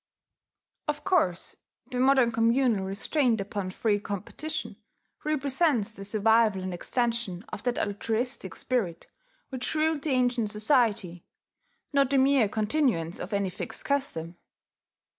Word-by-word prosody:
Of 295 0 -2
course 185 - +1 0.4
the 250 - -2
modern 260 -2 +4
communal 230 -2 +2
restraint 230 +4 +1
upon 195 -1 -3
free 205 +2 0
competition 210 +11 -5 0.5
represents 280 -6 +1
the 195 - -8
survival 215 -1 +3
and 185 -1 -3
extension 230 -1 -2
of - - -6
that 245 -1 -1
altruistic 225 +5 -2
spirit 200 -10 -2 0.4
which 260 +2 -3
ruled 310 -1 +1
the 305 - -3
ancient 245 -4 +1
society, 210 - +1 0.7
not 275 -2 +4
the 275 - +2
mere 265 -5 +4
continuance 215 - 0
of 190 - -6
any 200 -2 0
fixed 190 - -6
custom. 175 - -1
230 Hz, 120 wpm, -28 LUFS, 200-270 Hz, 0.7 s, modern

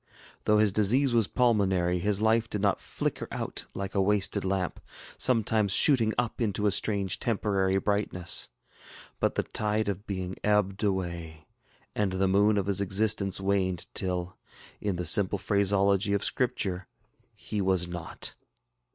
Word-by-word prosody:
Though 105 - +4
his 105 -1 +3
disease 120 +6 +2
was 115 -4 +2
pulmonary, 95 -7 +1
his 105 +3 0
life 115 +1 +2
did 105 - -3
not 100 0 0
flicker - - -4
out - - -5
like 100 0 -5
a 100 - +1
wasted 100 0 0
lamp, 95 -2 -2 0.4
sometimes 110 -4 +2
shooting 115 -5 +6
up 120 0 -2
into 105 -2 -1
a 105 - +3
strange 100 -1 0
temporary 100 -5 0
brightness; 95 -3 0 0.7
but - - 0
the - - 0
tide 105 0 -2
of 100 +1 -4
being 95 -2 -4
ebbed 105 -1 +1
away, 85 -5 -3 0.5
and 100 -3 -1
the 95 +1 +1
noon 105 +2 +3
of 100 - 0
his 100 0 -1
existence 100 0 0
waned 95 -2 -1
till, 90 -1 -2 0.4
in 100 -3 -2
the 90 0 -4
simple 100 +4 +2
phraseology 100 0 +2
of 100 - 0
Scripture, 100 -7 -2 0.5
ŌĆ£he 105 - -4
was 95 -2 +1
not. 85 -1 -5
100 Hz, 150 wpm, -28 LUFS, 95-105 Hz, 0.7 s, shooting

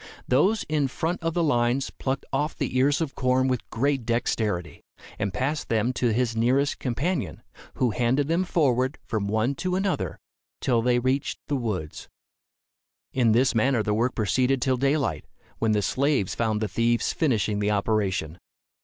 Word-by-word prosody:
Those 190 - +3
in 150 -2 +1
front 165 +7 -3
of 165 0 -2
the 175 - +2
lines 125 -2 +1
plucked 135 0 -3
off 150 +1 0
the 135 -3 -3
ears 140 +3 +3
of 155 -4 -2
corn 130 0 +1
with 125 -3 -2
great 135 +2 0
dexterity, 110 -6 -1 0.4
and 100 - -1
passed 140 +9 -2
them 115 +2 +1
to 120 -2 +1
his 120 0 0
nearest 130 +5 +1
companion, 140 +5 -2 0.3
who 125 -3 +1
handed 125 +5 +1
them 170 +3 +1
forward 130 -6 +1
from 105 -3 -2
one 110 +6 +1
to 180 +6 -2
another, 190 0 -1 0.4
till 120 -3 +1
they 120 +1 +2
reached 130 +3 0
the 145 - +1
woods. 105 - -4 1.0
In 120 -4 +3
this 125 +3 +3
manner 120 0 +2
the 105 - 0
work 120 +4 0
proceeded 125 +4 +1
till 130 +1 +1
daylight, 140 +2 0 0.3
when 110 -1 +2
the 105 -1 +1
slaves 135 -4 +1
found 110 -2 -1
the 110 - 0
thieves 115 +2 +1
finishing 110 - +1
the 105 0 +1
operation. 100 -5 0
125 Hz, 165 wpm, -25 LUFS, 110-140 Hz, 1.0 s, Those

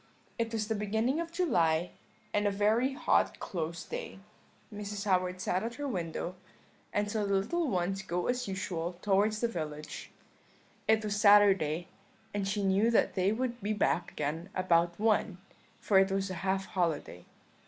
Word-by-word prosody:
It 230 -1 0
was 220 -2 -2
the 220 - 0
beginning 220 +7 0
of 335 0 -4
July, 175 - +1 0.4
and 205 0 +2
a - - +4
very 215 +6 +2
hot 270 - +2
close 170 -2 -4
day; - - -6 0.6
Mrs. 205 0 -5
Howard 185 -2 +1
sat 185 0 0
at 235 +1 -4
her 290 0 -4
window, 175 -5 -3 0.6
and 205 0 0
saw 215 -1 0
the 200 -1 +1
little 310 - 0
ones 190 0 -1
go 180 -2 -2
as 250 -1 -1
usual 180 -3 -3
towards 210 +2 +2
the 235 - +3
village; 155 -7 -6 0.8
it 220 0 +4
was 205 0 -1
Saturday, 195 -6 +5 0.5
and 200 -1 -1
she 205 +1 -1
knew 195 +4 +3
that 235 - +3
they 190 +1 +2
would 240 +1 -2
be 210 +2 -1
back 175 -4 +1
again 160 +6 -3
about 170 -1 +2
one, 215 -3 +2 0.4
for 195 -2 +4
it 195 0 +4
was 195 0 -1
a 170 -2 -5
half 195 0 0
holiday. 160 - -2
200 Hz, 165 wpm, -31 LUFS, 180-220 Hz, 0.8 s, Saturday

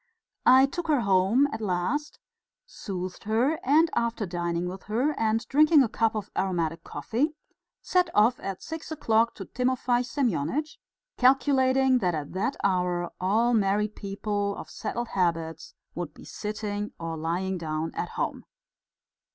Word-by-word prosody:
I 260 +2 +8
took 340 +5 -4
her 295 -5 +3
home 200 +7 +3
at 225 - -4
last, 210 +10 -1 0.5
soothed 185 - -6
her, 245 +9 +1
and 305 +5 +5
after 235 -2 0
dining 175 -1 -2
with 190 +1 -6
her 240 +8 +1
and 225 -2 0
drinking 300 +1 +5
a - - +1
cup 225 0 +1
of 210 -2 -4
aromatic 165 -3 -1
coffee, 295 +7 -2 0.5
set 360 -1 +2
off 225 +4 +4
at 195 -1 -5
six 320 0 -7
o'clock 230 -6 +2
to 195 - -7
Timofey 250 0 0
Semyonitch, 255 - -1 0.4
calculating 265 0 +4
that 180 -6 0
at 145 -2 -5
that 205 +9 -1
hour 180 -2 0
all 220 +6 +2
married 210 0 +1
people 200 0 -2
of - - -9
settled 235 +2 -4
habits 165 -4 -2 0.2
would 170 -3 -5
be - - -13
sitting 210 -1 -4
or 165 -1 -4
lying 175 +4 -2
down 155 0 -3
at - - -3
home. - - -2
215 Hz, 145 wpm, -27 LUFS, 180-255 Hz, 0.5 s, I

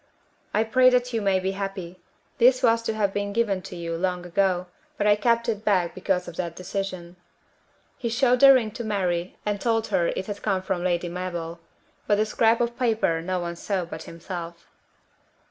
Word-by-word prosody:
"I 215 - +2
pray 255 +3 +5
that 250 -1 +1
you 225 - 0
may 195 -2 +2
be 190 +1 -1
happy. 195 -2 -5 0.4
This 255 +2 +5
was 230 -1 +4
to 225 -1 -2
have 200 -3 0
been 200 0 -2
given 205 -4 +1
to 180 - -9
you 170 -1 -4
long 180 0 -2
ago, 180 0 +1 0.3
but 205 - 0
I 205 0 +6
kept 235 +2 +1
it 215 -2 -2
back 185 -5 +2
because 185 -1 -1
of 175 - -9
that 170 -2 -3
decision." 185 -2 -5 0.8
He 235 - -2
showed 250 +1 +3
the 275 +1 +9
ring 240 -5 +3
to 235 +2 -6
Mary 185 -5 -1
and 205 -1 -1
told 225 -2 +1
her 170 - +2
it 185 - -2
had 205 0 -6
come 190 -3 0
from 185 -2 -2
Lady 175 -1 0
Mabel; 170 -1 -5 0.5
but 205 - +4
the 215 +1 +2
scrap 225 +1 +2
of 235 0 -2
paper 220 -9 +1
no 185 +2 -2
one 170 0 -4
saw 185 +1 -2
but 160 -2 -8
himself. 170 0 -7
195 Hz, 195 wpm, -25 LUFS, 175-225 Hz, 0.8 s, the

